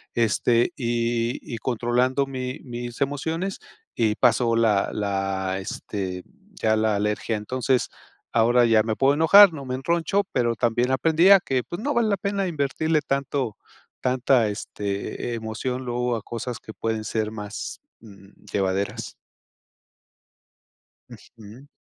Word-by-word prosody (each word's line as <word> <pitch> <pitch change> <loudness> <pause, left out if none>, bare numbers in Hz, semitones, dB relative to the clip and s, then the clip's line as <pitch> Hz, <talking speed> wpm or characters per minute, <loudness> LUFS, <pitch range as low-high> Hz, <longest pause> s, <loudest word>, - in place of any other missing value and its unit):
este, 115 +4 +2
y 120 -1 -1
y - - -2
controlando 125 +3 +1
mi 130 0 -5
mis 120 -1 -7
emociones 160 +7 -2 0.4
y 110 -2 +1
pasó 120 -1 +3
la 110 -4 +2
la, 95 -2 -2
este, 95 -1 -5 0.4
ya 110 0 +2
la 110 -1 +1
alergia. 105 +2 -1
Entonces, 125 +4 0 0.5
ahora 120 +2 +4
ya 115 -2 +5
me 110 0 -2
puedo 135 +3 +3
enojar, 175 +5 +7
no 140 -3 -7
me 130 0 -3
enroncho, 170 +8 0
pero 120 -2 +1
también 120 +2 +1
aprendí 160 +7 +3
a 200 -1 +9
que, 130 -7 -1
pues, 175 - -7
no 285 +6 -1
vale 235 -4 +2
la 200 - +1
pena 200 0 -1
invertirle 155 0 0
tanto 135 -5 -2 0.4
tanta, 125 -2 +2
este, 105 +3 -4
emoción 125 +3 -4
luego 125 0 -1
a 110 - -5
cosas 120 +1 -5
que 110 - -11
pueden 110 -1 -3
ser 110 0 -2
más, 105 -1 -6 0.2
mm, 100 -3 -15 0.2
llevaderas. 95 0 -2 1.9
Ujú. 115 +4 -14
120 Hz, 135 wpm, -24 LUFS, 110-135 Hz, 1.9 s, a